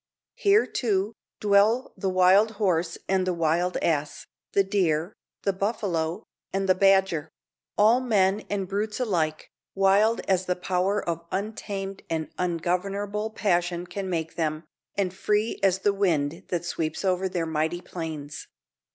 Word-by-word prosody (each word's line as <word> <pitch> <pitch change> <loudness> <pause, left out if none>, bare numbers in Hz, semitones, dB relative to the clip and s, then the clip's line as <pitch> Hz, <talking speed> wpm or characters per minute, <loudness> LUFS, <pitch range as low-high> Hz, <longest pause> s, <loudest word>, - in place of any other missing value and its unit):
Here, 430 -3 +4
too, 210 -2 -1 0.3
dwell 210 +5 +3
the 195 - -2
wild 185 +4 +5
horse 180 -5 0
and 190 -1 +1
the 180 - 0
wild 170 +2 +1
ass, 145 -3 -1 0.3
the 200 - +4
deer, 180 -3 0 0.3
the 195 - +1
buffalo, 185 -5 -1 0.3
and 195 0 -1
the 185 - +6
badger; 190 -5 +3 0.5
all, 220 +4 +5
men 205 -4 +2
and 195 -2 -2
brutes 210 +3 -2
alike, 165 -10 -1 0.2
wild 200 +4 +4
as 185 -1 0
the 180 - +1
power 185 +3 -1
of 170 0 -2
untamed 195 -1 -4
and 160 -1 -2
ungovernable 195 +5 -1
passion 175 -5 0
can 195 +1 -5
make 160 -2 -2
them, 155 -1 -1 0.3
and 190 -3 0
free 210 +3 0
as 190 -2 +3
the 200 +1 +1
wind 170 -3 0
that 175 -1 -2
sweeps 165 +2 -3
over 185 0 +1
their 175 -2 -1
mighty 160 +2 -1
plains. 155 -5 -6
190 Hz, 140 wpm, -26 LUFS, 170-200 Hz, 0.5 s, the